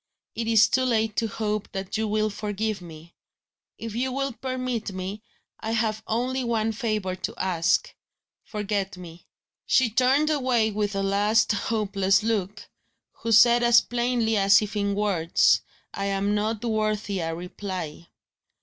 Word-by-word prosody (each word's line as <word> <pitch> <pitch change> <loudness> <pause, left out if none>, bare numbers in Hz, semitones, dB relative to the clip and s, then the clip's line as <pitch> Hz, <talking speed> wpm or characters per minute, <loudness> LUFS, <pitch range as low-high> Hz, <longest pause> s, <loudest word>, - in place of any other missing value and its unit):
It 230 0 -3
is 220 -2 +5
too 260 - +1
late 220 -3 +1
to 225 - +1
hope 210 -1 -3
that 190 -1 -4
you 220 0 0
will 215 0 0
forgive 210 0 -3
me. 165 -1 -12 0.6
If 225 -1 -6
you 255 +3 -1
will 275 0 -2
permit 255 -3 -3
it, 190 +2 -6 0.4
I 220 - -4
have 220 -1 0
only 255 +3 -1
one 225 -2 0
favour 215 -4 -2
to - - -5
ask. 180 -2 +1 0.5
Forget 205 -2 -3
me." 175 -1 -12 0.4
She 255 -4 +3
turned 270 +6 +3
away 250 -6 +1
with 205 -1 -2
a 195 - -1
last 210 +3 +2
hopeless 200 -2 +1
look, 215 -2 -2 0.5
who 230 - -3
said 235 +2 +6
as 240 -1 +6
plainly 240 -2 0
as 195 0 +6
if 210 +1 -6
in 200 -1 0
words: 190 -5 +2 0.3
"I 195 - -3
am 200 +1 0
not 215 +2 -1
worth 215 -2 -1
a 180 -5 -2
reply." 180 -2 -6
215 Hz, 150 wpm, -25 LUFS, 195-230 Hz, 0.6 s, said